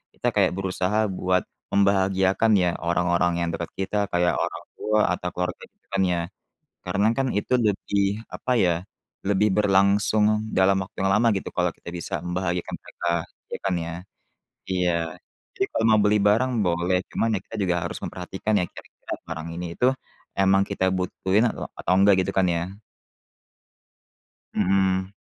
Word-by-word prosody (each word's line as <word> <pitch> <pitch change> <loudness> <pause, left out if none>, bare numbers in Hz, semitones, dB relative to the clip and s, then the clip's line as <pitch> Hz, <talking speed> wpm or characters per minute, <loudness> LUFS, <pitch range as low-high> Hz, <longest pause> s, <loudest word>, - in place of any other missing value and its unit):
kita - - -2
kayak - - +3
berusaha 95 +2 -1
buat 90 0 +1 0.2
membahagiakan, 95 +1 +2
ya, 90 -2 +3
orang-orang 85 0 +1
yang 85 - -1
dekat 85 0 -5
kita, 95 +2 -2
kayak 90 -2 +1
orang - - -3 0.2
tua 110 0 +1 0.2
atau 90 - -4
keluarga, 90 0 -2
gitu - - -47
kan 95 0 +1
ya. 90 -1 +1 0.6
Karena 100 +3 0
kan 135 +1 0
itu 115 +5 0
lebih, 100 0 0
apa 125 - -2
ya, 90 -6 +3 0.5
lebih 100 0 +3
berlangsung 105 +2 +3
dalam 95 +1 +4
waktu 95 - -8
yang 95 - +3
lama, 115 +3 +4
gitu, - - -5
kalau 90 0 +1
kita 85 - -9
bisa 85 -1 -5
membahagiakan 90 0 -2
mereka, 85 0 -3 0.4
ya - - -3
kan 95 -2 +1
ya? 85 - -5 0.8
Iya. 90 -2 +1 0.7
Jadi, - - +3
kalau 110 - +1
mau 110 - +5
beli 105 +1 +4
barang 110 +6 +3
boleh, 90 +1 +1
cuma - - 0
ya - - +1
kita 115 - -9
juga 90 -2 +1
harus - - -4
memperhatikan, 95 +4 -4
ya, - - +1
kira-kira - - -9
barang 80 0 -5
ini, 90 0 -4
itu 125 - +2 0.5
memang 95 0 +4
kita 95 - -1
butuhin 95 +3 +1
atau, - - -5
atau - - 0
enggak, 100 +1 +6
gitu 95 - -2
kan 95 -1 +4
ya? 90 +3 -2 1.8
Mhm. 95 0 +1
95 Hz, 160 wpm, -24 LUFS, 90-100 Hz, 1.8 s, enggak